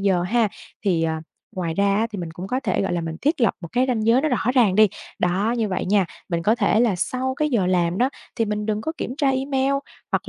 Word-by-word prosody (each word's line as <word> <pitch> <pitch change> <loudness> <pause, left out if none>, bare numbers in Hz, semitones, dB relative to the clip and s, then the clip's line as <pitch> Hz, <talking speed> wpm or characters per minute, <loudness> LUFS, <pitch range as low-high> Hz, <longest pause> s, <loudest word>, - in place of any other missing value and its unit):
giờ 190 -3 +2
ha, 225 +3 +2 0.4
thì, 175 -4 +2
à, 160 -1 -1 0.4
ngoài 170 -3 -2
ra 200 +1 +2
á, 225 +2 +2
thì 205 - -6
mình 170 -2 -5
cũng 175 +3 -7
có 255 +5 -1
thể, 200 -6 0
gọi 185 - -1
là, 175 - 0
mình 165 -1 -4
thiết 295 0 +1
lập 230 - +3
một 170 - -7
cái 250 +1 +3
ranh 225 -3 0
giới 240 +3 +5
nó 310 - +1
rõ 250 - 0
ràng 220 -7 +4
đi. 215 0 +6 0.3
Đó, 195 +7 +1
như 220 -3 0
vậy 185 - -2
nha, 195 -2 +3 0.2
mình 170 -1 -1
có 215 +4 +3
thể 220 -1 +2
là 220 -7 +2
sau 260 +7 -1
cái 300 +1 0
giờ 210 -8 +2
làm 175 -1 +1
đó 255 +3 +2 0.3
thì 225 - +2
mình 210 0 -2
đừng 215 0 -1
có 320 - -3
kiểm 250 - -4
tra 275 -2 +3
email 270 0 0 0.4
hoặc - - -1
210 Hz, 270 wpm, -23 LUFS, 180-250 Hz, 0.4 s, đi